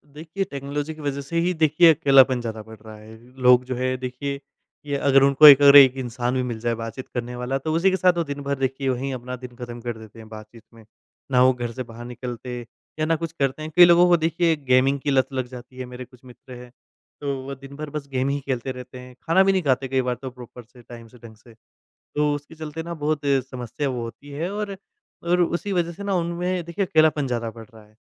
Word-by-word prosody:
देखिए 165 +5 -4
टेक्नोलॉजी 145 +2 -4
की 155 - -12
वजह 140 -1 -3
से 155 +5 -5
ही, 180 +2 +1
देखिए, 160 +1 +5
अकेलापन 135 -4 +4
ज़्यादा 110 -2 -5
बढ़ 110 0 -13
रहा 110 -1 -10
है। 110 +1 -14 0.2
लोग 125 0 +6
जो 130 - -4
है 130 +1 -1
देखिए, 130 +2 -5 0.5
कि 145 - -4
अगर 135 -1 +3
उनको 140 +2 +7
एक 145 -1 +10
अगर 140 0 +8
एक 135 -2 +9
इंसान 125 -1 -3
भी 130 - +1
मिल 120 -3 -4
जाए 120 +1 -1
बातचीत 115 +3 -7
करने 120 0 -4
वाला, 125 +2 -2
तो 155 +3 -3
उसी 180 +4 +3
के 190 - 0
साथ 180 -2 +3
वो 170 - +1
दिन 145 -2 -6
भर 140 0 -1
देखिए 135 0 -1
वहीं 130 +2 -2
अपना 125 0 -6
दिन 125 -1 -11
ख़त्म 120 0 -7
कर 120 -1 -5
देते 110 0 -14
हैं, 110 - -12
बातचीत 110 +1 -12
में। 115 -1 -17 0.5
ना 125 - +4
वो 130 0 +5
घर 120 -1 -5
से 130 +2 -6
बाहर 120 0 -11
निकलते 125 0 -7 0.4
या 155 - +1
ना 165 +1 +1
कुछ 165 0 -5
करते 135 +2 -1
हैं। 155 - -6
कई 180 - +9
लोगों 175 +1 +6
को 175 -1 +5
देखिए 165 +1 +1
गेमिंग 130 +2 +3
की 145 - -2
लत 130 -1 +2
लग 130 -1 -2
जाती 125 +1 -12
है, 130 - -5
मेरे 125 0 -9
कुछ 125 0 -22
मित्र 125 +1 -14
हैं, 125 0 -11 0.5
तो 140 -1 -2
वो 140 0 -6
दिन 135 +1 -12
भर 150 0 -6
बस 150 -1 -6
गेम 130 +1 0
ही 140 +1 -1
खेलते 130 -1 -3
रहते 125 0 -10
हैं, 125 0 -13
खाना 180 +4 +4
भी 195 - +3
नहीं 190 -1 +1
खाते 135 -2 +1
कई 130 0 0
बार 125 -1 -2
तो 130 - -5
प्रॉपर 125 -1 -12
से, 120 +2 -19
टाइम 115 -1 -12
से, 125 +2 -18
ढंग 115 -1 -14
से। 115 +2 -19 0.6
तो 150 0 +1
उसके 145 +2 -10
चलते 160 +1 -7
ना 170 0 -6
बहुत 150 -1 -2
अ, 140 -1 +3
समस्या 130 +3 -4
वो 125 -2 -4
होती 115 +5 -10
है, 160 +6 -4
और 205 -1 -4 0.5
और 175 +1 +2
उसी 175 +4 -1
वजह 170 -2 0
से 190 +4 -9
ना, 200 -1 -2
उनमें 175 +1 -2
देखिए 170 +4 -2
अकेलापन 155 -5 +2
ज़्यादा 115 -2 -2
बढ़ 115 0 -12
रहा 110 -1 -15
है। 105 - -26
135 Hz, 250 wpm, -23 LUFS, 125-155 Hz, 0.6 s, एक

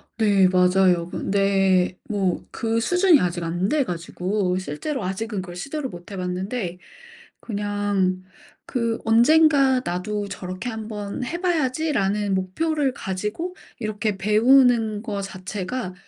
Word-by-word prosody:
네. 200 -4 +4
맞아요. 180 -1 +3
그런데 195 -2 +1
뭐 195 -4 0
그 225 0 -1
수준이 355 +5 +4
아직 175 -1 -1
안 175 +4 -1
돼 300 -2 +2
가지고 180 0 -2
실제로 190 - -4
아직은 195 +2 -3
그걸 175 -1 -9
시도를 275 - -4
못 175 +3 -11
해 195 - -6
봤는데 180 +1 -3 0.6
그냥 205 -3 -1 0.4
그 230 -2 -1
'언젠가 270 +3 +5
나도 205 +4 -2
저렇게 185 +6 -5
한번 215 -1 -5
해 340 +7 -4
봐야지.'라는 260 - 0
목표를 275 - 0
가지고 210 - -4 0.2
이렇게 215 -2 -2
배우는 220 +1 +4
거 205 -3 -3
자체가 190 +2 -5
205 Hz, 260 characters per minute, -23 LUFS, 185-245 Hz, 0.6 s, 언젠가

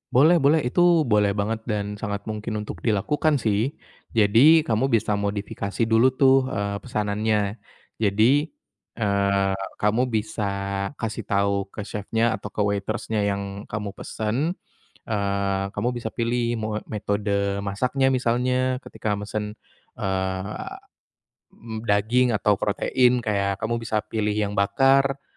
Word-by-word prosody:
Boleh 160 +6 +6
boleh 145 0 +3
itu 125 +8 +1 0.2
boleh 105 -3 +2
banget 110 +2 -1
dan 105 -1 -2
sangat 100 -2 -4
mungkin 110 0 -4
untuk - - -8
dilakukan 145 +8 +1
sih, 110 +4 0 0.4
jadi 125 +10 +6
kamu 115 +4 +1
bisa 110 -3 +1
modifikasi 100 +1 -2
dulu 115 +3 +4
tuh, 135 -1 +4
eee, 100 0 -3
pesanannya, 105 0 -1 0.4
jadi, 115 +9 +3 0.5
eee, 100 -2 +1 0.2
kamu 105 +3 +2
bisa 110 -1 -2 0.5
kasih 110 0 -3
tahu 100 -1 +1
ke 100 0 -7
chefnya 110 +3 0
atau 100 +2 -6
ke - - -30
waitress-nya 100 +1 -1
yang 100 0 -3
kamu 105 -2 -4
pesan, 125 - -2 0.5
eee, 100 -2 0
kamu 105 +4 -1
bisa 115 -2 -4
pilih 120 0 0
mau 110 0 -2
metode 100 -1 -1
masaknya 130 +7 +1
misalnya 125 +1 +1
ketika 105 -2 -3
mesen, 105 +1 -4 0.4
eee, 95 +1 -2 1.0
mmm, 110 0 -8
daging 115 +4 +2
atau 105 -1 +2
protein 125 +4 +2
kayak 100 -2 -1
kamu 115 +1 -1
bisa 110 -2 -1
pilih 105 -1 0
yang 105 -1 -2
bakar, 135 +6 +3
105 Hz, 130 wpm, -24 LUFS, 100-120 Hz, 1.0 s, Boleh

